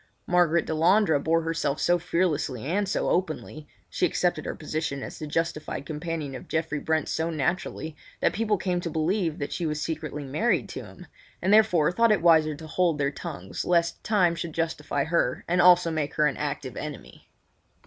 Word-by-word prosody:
Margaret 170 -2 +3
Delandre 165 +1 +3
bore 165 +1 +2
herself 160 -3 -1
so 175 0 +3
fearlessly 160 -8 -1
and 195 +6 0
so - - 0
openly—she 150 - -4
accepted - - +1
her - - -3
position 155 -4 -3
as - - -8
the 155 - -5
justified 155 -2 -2
companion 155 -2 -4
of 130 - -8
Geoffrey 160 -2 -1
Brent 160 0 0
so 160 +1 -1
naturally 160 0 -2 0.2
that - - +2
people 215 -1 +1
came 180 -1 -1
to 170 - -3
believe 165 +1 0
that 145 - -4
she 170 - -2
was 150 0 -2
secretly 150 -2 -4
married 155 - 0
to - - -6
him, - - -12 0.3
and 195 - +2
therefore 180 -8 +5
thought 230 +4 +3
it 210 - +2
wiser 160 -3 +5
to 160 +2 -10
hold 170 0 +1
their 140 -1 0
tongues 95 -9 -6
lest 170 -1 +1
time 185 -6 +3
should 170 -1 -5
justify 150 -3 -1
her 160 -6 0
and 175 +1 +3
also 180 -1 +6
make 155 -2 -2
her 150 - +3
an 145 - +1
active 140 -3 -4
enemy. 150 -1 -8
160 Hz, 180 wpm, -26 LUFS, 150-175 Hz, 0.3 s, also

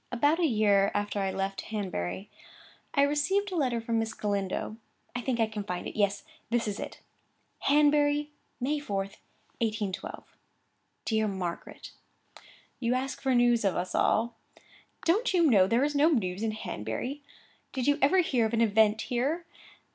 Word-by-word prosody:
About 290 +7 +2
a 340 - +3
year 205 -5 +3
after 205 0 -1
I 195 -1 0
left 195 0 -2
Hanbury, 195 - -3 0.7
I 280 - +5
received 370 +8 +1
a - - -3
letter 255 -7 +1
from 230 0 -1
Miss 225 0 -2
Galindo; 200 +1 -2 0.4
I 245 - -1
think 245 -1 -1
I 225 - +4
can 215 -1 -5
find 180 -3 -4
it.—Yes, 200 -1 0 0.3
this 235 -1 +1
is 205 0 -3
it. - - -7 0.6
'Hanbury, 295 0 +3 0.3
May 290 +4 0
4, 205 -9 -3 0.6
1811. 215 -4 -2 0.8
DEAR 220 -1 +1
MARGARET, 185 -4 -5 0.9
'You 245 0 +1
ask 265 +1 -3
for 265 -2 +2
news 240 -1 +4
of 195 -2 +1
us 180 +1 -2
all. 235 +2 +2 0.7
Don't 395 +5 +2
you 345 - +4
know 200 -10 +5
there 230 +5 +2
is 295 +1 +1
no 295 +3 +4
news 195 - 0
in 220 -1 0
Hanbury? 215 - -4 0.5
Did 260 -3 -2
you 285 +1 +3
ever 320 +8 +5
hear 245 -9 +1
of 225 - -2
an 230 - +2
event 220 0 +4
here? 280 +8 -1
230 Hz, 160 wpm, -29 LUFS, 205-285 Hz, 0.9 s, I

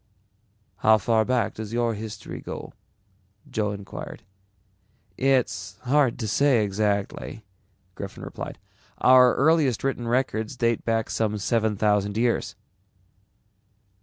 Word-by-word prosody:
"How 110 +2 +5
far 110 +1 +2
back 125 -2 0
does 110 0 -7
your 120 -1 +1
history 110 -1 -7
go?" - - -7 0.7
Joe 105 -1 -1
inquired. 100 -1 -7 0.9
"It's 120 -9 0
hard 135 -1 +2
to 110 - -3
say 125 +1 +3
exactly," 100 +2 -2 0.5
Griffin - - -8
replied. - - -7 0.4
"Our 125 -1 +6
earliest 150 -5 +3
written 130 -3 -1
records 120 -1 -1
date 115 -2 +1
back 115 -1 0
some 105 -1 0
seven 110 +1 0
thousand 105 0 +1
years." 115 -4 0
110 Hz, 110 wpm, -25 LUFS, 105-125 Hz, 0.9 s, Our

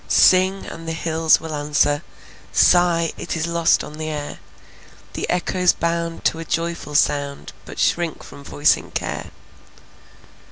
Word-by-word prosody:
Sing, 185 +1 +4
and 165 0 -9
the 165 - -2
hills 160 -1 +2
will 160 -1 -7
answer; 145 0 +1 0.5
Sigh, 170 -2 +4
it - - -4
is 160 - -1
lost 170 -1 +2
on 150 +1 -10
the 155 0 -3
air. 145 -1 -5 0.7
The - - -4
echoes 180 0 +2
bound 170 0 -3
to 160 - +1
a - - -4
joyful 165 -2 -3
sound, 145 -1 0
But - - -10
shrink 170 -2 0
from 140 - -12
voicing 145 +1 +1
care. - - -4
165 Hz, 145 wpm, -21 LUFS, 150-170 Hz, 0.7 s, Sing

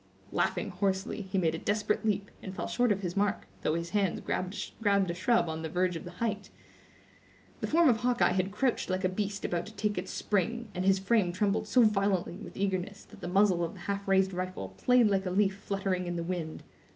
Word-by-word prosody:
Laughing - - 0
hoarsely, 195 +1 -1
he 190 0 -3
made 165 -4 +2
a 165 - -3
desperate 210 +1 0
leap, 205 -2 0
and 190 -1 -7
fell - - -3
short 245 -2 +1
of 200 -1 0
his 180 -1 -3
mark, 205 0 0 0.2
though 155 - +1
his 170 +1 -3
hands 200 -4 +1
grasped 185 +3 -3
a 200 -4 +3
shrub 230 +2 +2
on 160 0 -3
the 160 - -4
verge 180 +1 +1
of 165 - -6
the 175 - -8
height. 215 -3 -2 1.1
The - - -2
form 335 +1 +4
of 240 -4 +5
Hawkeye 245 -3 +2
had 185 +1 +1
crouched 245 +2 0
like 185 +1 -1
a 185 - +3
beast 200 +1 -3
about 175 +3 -1
to 220 - -12
take 210 -3 0
its 185 - -6
spring, 225 +3 -1
and 180 0 -2
his 195 0 +5
frame 195 -1 +2
trembled 200 +3 0
so 245 +3 +5
violently 195 -4 +1
with 215 - -10
eagerness 195 0 -2
that - - -14
the - - -4
muzzle 185 -1 +3
of 165 - -3
the - - -12
half 200 0 -3
raised 190 0 +3
rifle 180 - -4
played 245 - +3
like 195 -2 +1
a - - 0
leaf 195 +1 +2
fluttering 195 -2 -2
in 175 - -2
the 170 - -2
wind. 165 -3 -4
195 Hz, 225 wpm, -30 LUFS, 180-210 Hz, 1.1 s, of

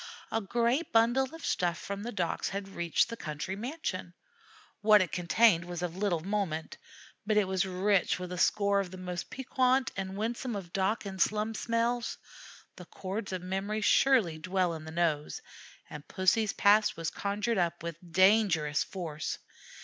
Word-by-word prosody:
A 225 - 0
great 235 - 0
bundle 240 +4 +3
of 325 - -8
stuff 175 -1 0
from 200 0 -5
the 235 +3 -4
docks 175 -6 -1
had 195 0 -5
reached 170 -3 +1
the 230 - -4
country 155 0 -5
mansion. 210 - -5 0.7
What 210 0 +7
it 185 -4 0
contained 180 0 +3
was 175 0 -5
of 175 -1 -3
little 190 -4 0
moment, 185 -4 -3 0.4
but 210 +1 +1
it 205 -3 +3
was 190 +1 0
rich 190 +1 +1
with 180 0 -6
a 180 - -4
score 200 +2 +3
of 195 -2 -2
the 185 - -9
most 180 -1 -5
piquant 260 0 +1
and 195 0 -4
winsome 235 +2 -2
of 180 -4 -7
dock 195 +3 0
and 190 -2 -5
slum 215 +3 +1
smells. 235 +2 -1 0.6
The 180 - -10
chords 195 +4 -5
of 185 -1 -4
memory 195 +4 -2
surely 215 -9 +3
dwell 185 +1 0
in 160 -1 -7
the 160 - -7
nose, 160 -3 -1 0.5
and 150 -1 -10
Pussy's 205 +3 +2
past 210 -1 +4
was 165 -1 -3
conjured 205 +2 -1
up 175 -1 -1
with 170 -2 -5
dangerous 185 -6 +4
force. 160 -5 -5
195 Hz, 170 wpm, -30 LUFS, 175-215 Hz, 0.7 s, What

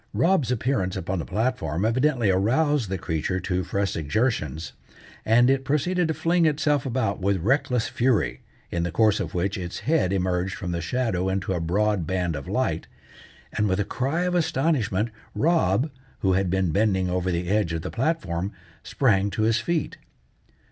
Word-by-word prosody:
Rob's 165 -8 +2
appearance 110 -6 0
upon 95 +2 -2
the - - -4
platform 105 - -1
evidently 120 -2 +2
aroused 125 - +2
the 95 - -1
creature 80 +2 -2
to 90 +1 -1
fresh 100 +1 -1
exertions, 80 - -1 0.5
and 120 +2 +5
it 135 0 +2
proceeded 170 +6 +1
to 160 - -1
fling 170 0 +2
itself 150 -2 +1
about 125 -5 -1
with 100 +1 +2
reckless 125 - +1
fury, 120 - 0 0.3
in 85 - -1
the 85 - -1
course 110 0 +3
of - - -4
which 95 +2 -1
its 90 -1 -5
head 150 - +1
emerged 95 0 0
from 90 -3 -4
the 85 -1 -2
shadow 95 -1 -1
into 95 0 -1
a 90 - -1
broad 95 +1 0
band 90 -3 -1
of 70 -2 -6
light, - - -1 0.7
and 105 -1 +1
with 95 +1 +1
a 100 - +1
cry 135 - -1
of 180 0 0
astonishment 135 - +1 0.2
Rob, 150 - +2 0.3
who 95 -1 +3
had 95 0 +1
been 95 -2 +1
bending 95 0 +2
over 90 0 -1
the 85 0 -2
edge 100 -3 +1
of 80 0 -3
the - - -4
platform, 100 - -1 0.3
sprang 100 -7 +1
to 110 - -2
his 115 +1 +3
feet. 160 +8 -2
105 Hz, 175 wpm, -25 LUFS, 90-130 Hz, 0.7 s, and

